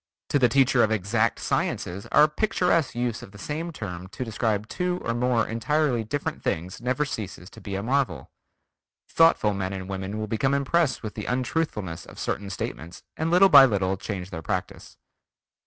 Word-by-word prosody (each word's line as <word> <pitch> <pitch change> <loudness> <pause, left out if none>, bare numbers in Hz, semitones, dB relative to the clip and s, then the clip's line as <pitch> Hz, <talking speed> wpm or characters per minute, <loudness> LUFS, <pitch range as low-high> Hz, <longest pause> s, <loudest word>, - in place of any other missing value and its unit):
To 145 - +2
the 125 -2 +4
teacher 135 -2 +4
of 110 - +4
exact 110 +2 +1
sciences 95 +3 -2
our 150 - +7
picturesque 170 - +1
use 120 -2 -2
of 100 - -12
the - - -11
same 155 - -4
term 95 - -6
to 125 +6 -6
describe 110 -2 -1
two 180 +4 -2
or 115 - -1
more 120 -1 +1
entirely 125 +1 0
different 140 +7 -3
things 90 +6 -3
never 130 +4 0
ceases 100 - -6
to - - -13
be 100 -2 -5
a 100 - -3
marvel.... 120 - -1 0.8
Thoughtful 165 -10 +4
men 95 -1 -3
and 95 -1 -6
women 95 +2 -4
will 110 - -2
become 125 +6 0
impressed 140 0 +1
with 110 - -5
the 105 - -6
untruthfulness 125 - -2
of - - -13
certain 100 -1 -3
statements 85 -3 -6
and 160 +1 -1
little 180 +3 +6
by 140 -4 +10
little 95 -5 0
change 95 -1 -6
their 80 -3 -5
practice. - - -5
115 Hz, 180 wpm, -25 LUFS, 100-140 Hz, 0.8 s, by